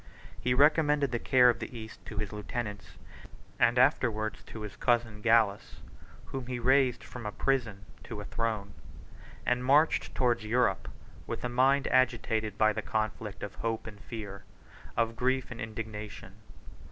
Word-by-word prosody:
He 125 0 +1
recommended 145 -1 +4
the 120 - -1
care 125 0 +5
of 120 - +3
the 125 - -6
East 110 -1 -10
to 105 - -8
his 105 0 -3
lieutenants, 105 -4 -5 0.6
and 120 +1 +4
afterwards 120 -5 +2
to 110 - -9
his 105 -2 -7
cousin 115 -3 +1
Gallus, 110 -3 +2 0.5
whom 130 -2 -6
he 125 -1 -3
raised 130 0 +3
from 120 -4 -7
a - - -3
prison 115 -6 -1 0.2
to - - -6
a - - -6
throne; 110 -3 -2 0.7
and 125 0 +1
marched 145 +5 +3
towards 120 -3 +2
Europe, 110 -4 +1 0.4
with - - -4
a 125 - -1
mind 135 +3 +3
agitated 110 -4 +1
by 110 0 +4
the 110 - -3
conflict 110 -1 -3
of 100 -1 -5
hope 115 -1 -3
and 105 -2 -9
fear, 100 -4 -7 0.5
of 115 0 +1
grief 130 +2 0
and 125 - -7
indignation. 110 -3 -7
115 Hz, 155 wpm, -30 LUFS, 105-125 Hz, 0.7 s, care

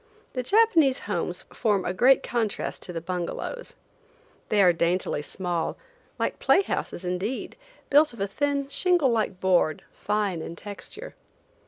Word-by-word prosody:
The 255 - -1
Japanese 325 - +4
homes - - -3
form 205 -5 +1
a 180 - -1
great 255 +8 +5
contrast 230 -4 -2
to - - -6
the 165 -1 -4
bungalows. 180 - -4 0.7
They 210 - +2
are 180 -2 +6
daintily 170 -2 0
small, 175 +1 -3 0.4
like - - -2
play 395 - +4
houses 185 - -4
indeed, 185 +8 -3 0.4
built 295 +2 +6
of 235 - -13
a 200 - 0
thin 280 +6 -1
shingle 345 -2 +3
like 215 -5 -1
board, 180 -5 +2
fine 205 -5 -1
in 165 - -6
texture. 210 - -8
210 Hz, 145 wpm, -26 LUFS, 180-275 Hz, 0.7 s, are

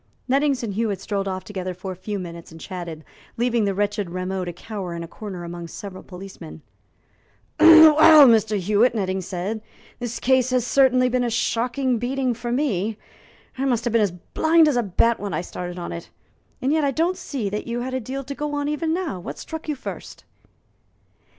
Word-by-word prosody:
Nettings 275 -1 +1
and 215 -4 -3
Hewitt 210 -2 -1
strolled 200 -1 -3
off 185 -1 -3
together 185 -2 -5
for 185 +1 -6
a - - -6
few 205 +3 -5
minutes 170 -3 -8
and 165 - -12
chatted, 170 -3 -7 0.3
leaving 235 -2 +1
the 200 -1 -1
wretched 205 -1 -1
Rameau 185 +1 -3
to 175 - -4
cower 185 -1 -6
in 170 - -5
a - - -7
corner 190 -1 -8
among 170 0 -7
several 190 +1 -8
policemen. 180 -4 -11 1.0
"Well, 315 -2 +9
Mr. 220 -2 +3
Hewitt," 210 +6 +2
Nettings 190 -3 -2
said, 195 +4 -3 0.4
"this 240 -1 -4
case 260 -1 +3
has 250 -2 +1
certainly 255 -1 +4
been 250 0 +1
a 240 - 0
shocking 245 +2 0
beating 255 +1 -1
for 240 +1 -5
me. 225 -6 0 0.6
I 270 - 0
must 240 -4 +1
have 240 -2 -1
been 230 - +4
as 205 - +3 0.2
blind 320 0 +5
as 295 - +2
a 245 - +3
bat 230 +3 +1
when 205 -1 -3
I - - -1
started 180 0 -6
on 175 - -5
it. 170 - -7 0.5
And 270 +3 +2
yet 315 -1 +2
I 280 - +2
don't 330 +7 0
see 265 - -4
that 210 - -4
you 235 +1 -2
had 255 +1 -4
a 260 - 0
deal 265 +3 -5
to 280 +2 -6
go 295 +1 -3
on, 290 0 -1
even 315 +2 -1
now. 340 - -3
What 175 - -7
struck 320 -1 -7
you 300 - 0
first?" 270 - -8
225 Hz, 200 wpm, -23 LUFS, 185-260 Hz, 1.0 s, Well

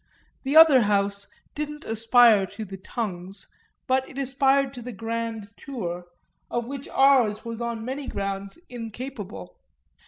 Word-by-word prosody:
The 275 +2 -2
other 315 -5 +9
house 200 -1 +1 0.3
didn't 300 0 -5
aspire 225 -2 +5
to 220 +3 -7
the 195 -1 -8
tongues, 190 -2 -5 0.4
but 260 0 +1
it 270 - -12
aspired 275 0 +2
to 250 - -8
the 250 +1 -6
grand 225 -1 -5
tour, 180 - -5 0.4
of 240 -1 -2
which 275 0 -6
ours 250 -6 +3
was 230 0 -5
on 235 -1 -3
many 265 +2 -4
grounds 195 -2 -4
incapable. 225 - -8
230 Hz, 135 wpm, -25 LUFS, 200-265 Hz, 0.4 s, other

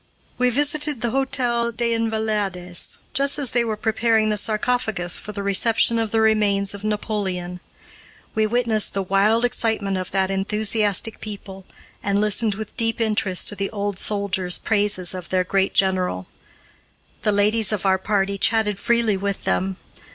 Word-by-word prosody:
We 250 0 +3
visited 290 +1 +1
the 240 - 0
Hôtel 240 -3 0
des 235 0 +1
Invalides 215 -6 -2 0.2
just 275 +2 +2
as 280 -5 0
they 240 -1 +2
were 220 -2 -3
preparing 220 0 +1
the 210 - +1
sarcophagus 215 -4 0
for 210 - -8
the 200 -1 -5
reception 225 +3 +3
of 225 -1 -1
the 225 +1 +1
remains 205 -2 +2
of 200 0 -9
Napoleon. 195 -4 -3 0.7
We 220 0 +1
witnessed 225 -3 +1
the 195 - 0
wild 205 +5 +2
excitement 215 -5 0
of 185 - -5
that 190 0 0
enthusiastic 210 +1 0
people, 195 -2 -8 0.3
and 200 0 0
listened 210 0 +1
with 215 0 -7
deep 225 -1 0
interest 210 -5 0
to 205 - -1
the 195 0 -2
old 205 -2 -3
soldiers' 190 -3 -1
praises 205 -4 0
of 180 -2 -7
their 185 -1 +1
great 195 +1 0
general. 185 - +1 1.0
The 210 - +1
ladies 210 +1 +2
of 205 -2 -2
our 190 -1 +3
party 200 0 -1
chatted 210 -2 +2
freely 235 -4 +1
with 200 0 -3
them. 190 0 -1
210 Hz, 160 wpm, -22 LUFS, 195-225 Hz, 1.0 s, We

